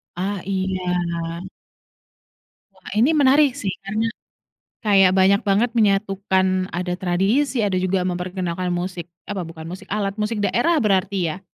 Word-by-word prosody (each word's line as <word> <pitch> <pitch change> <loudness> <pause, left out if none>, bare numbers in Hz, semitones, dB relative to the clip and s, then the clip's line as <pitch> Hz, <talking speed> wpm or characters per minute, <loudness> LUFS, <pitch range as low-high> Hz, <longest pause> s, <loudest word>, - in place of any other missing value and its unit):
Ah 195 +2 -2
iya. 180 -3 -2 1.3
Wah, - - -13
ini 245 +8 +4
menarik 285 -1 +5
sih, 195 -2 -2
karena 215 +3 -1 0.8
kayak 195 -3 +5
banyak 195 +2 +5
banget 220 +5 +3
menyatukan, 195 -2 +2 0.3
ada 180 +1 -2
tradisi, 200 +10 +1
ada 195 -3 0
juga 185 0 0
memperkenalkan 180 0 -3
musik 175 -1 -4 0.2
apa 200 -3 -3
bukan 160 -1 -9
musik, 185 +2 -8
alat 200 -2 -1
musik 215 +1 -1
daerah 320 +10 +2
berarti 195 -1 +1 0.2
ya? 190 0 -14
190 Hz, 130 wpm, -22 LUFS, 180-210 Hz, 1.3 s, menarik